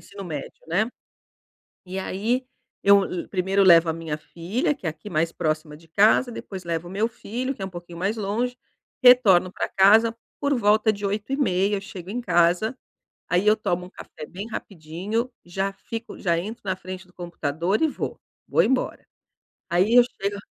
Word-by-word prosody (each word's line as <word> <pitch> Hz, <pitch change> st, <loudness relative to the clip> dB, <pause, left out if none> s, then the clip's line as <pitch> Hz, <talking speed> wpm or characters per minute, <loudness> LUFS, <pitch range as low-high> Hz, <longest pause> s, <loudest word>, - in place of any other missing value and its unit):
ensino 200 Hz, -1 st, -10 dB
médio, 150 Hz, -5 st, -6 dB
né? 200 Hz, +8 st, +1 dB, 1.0 s
E 185 Hz, +1 st, -6 dB
aí, 225 Hz, +7 st, -1 dB, 0.4 s
eu 200 Hz, 0 st, +6 dB
le 180 Hz, -, -4 dB
primeiro 190 Hz, +1 st, +1 dB
eu 195 Hz, -, +5 dB
levo 170 Hz, -2 st, +7 dB
a -, -, +1 dB
minha 160 Hz, -2 st, -4 dB
filha, 205 Hz, -, -2 dB
que 230 Hz, -, -14 dB
é -, -, +2 dB
aqui 160 Hz, +7 st, -10 dB
mais 165 Hz, 0 st, 0 dB
próxima 155 Hz, -2 st, -2 dB
de 165 Hz, +1 st, -20 dB
casa, 215 Hz, +8 st, +4 dB
depois 190 Hz, -4 st, -7 dB
levo 170 Hz, 0 st, -2 dB
o -, -, -9 dB
meu 210 Hz, +4 st, +1 dB
filho 245 Hz, +3 st, -4 dB
que 195 Hz, -, -7 dB
é -, -, -2 dB
pouquinho 175 Hz, -1 st, -9 dB
mais 200 Hz, +6 st, -1 dB
longe. 235 Hz, +5 st, -2 dB, 0.4 s
Retorno 225 Hz, -8 st, +7 dB
pra -, -, -3 dB
casa 220 Hz, +4 st, +5 dB, 0.3 s
por 285 Hz, 0 st, +2 dB
volta 215 Hz, -1 st, +3 dB
de 205 Hz, -1 st, -5 dB
8:30 205 Hz, -2 st, 0 dB
eu -, -, -6 dB
chego 190 Hz, -3 st, -9 dB
em 235 Hz, -, -3 dB
casa, 180 Hz, +3 st, +2 dB, 0.5 s
aí 180 Hz, +3 st, +2 dB
eu 215 Hz, +1 st, +5 dB
tomo 180 Hz, -2 st, -2 dB
café 150 Hz, -, -10 dB
bem 195 Hz, +7 st, -7 dB
rapidinho, 195 Hz, +6 st, -4 dB
já 195 Hz, +3 st, -2 dB
fico 230 Hz, +4 st, -7 dB
já 170 Hz, -3 st, +1 dB
entro 215 Hz, +7 st, -6 dB
na 185 Hz, -1 st, 0 dB
frente 185 Hz, +1 st, -8 dB
do 180 Hz, -, -24 dB
computador 170 Hz, -, -2 dB
e 320 Hz, -, +5 dB
vou, 295 Hz, -, -4 dB, 0.3 s
vou -, -, +3 dB
embora. 255 Hz, +1 st, 0 dB, 0.6 s
Aí 185 Hz, +6 st, +2 dB
eu 245 Hz, -, +9 dB, 0.2 s
chego 200 Hz, +1 st, -2 dB
195 Hz, 180 wpm, -24 LUFS, 175-220 Hz, 1.0 s, eu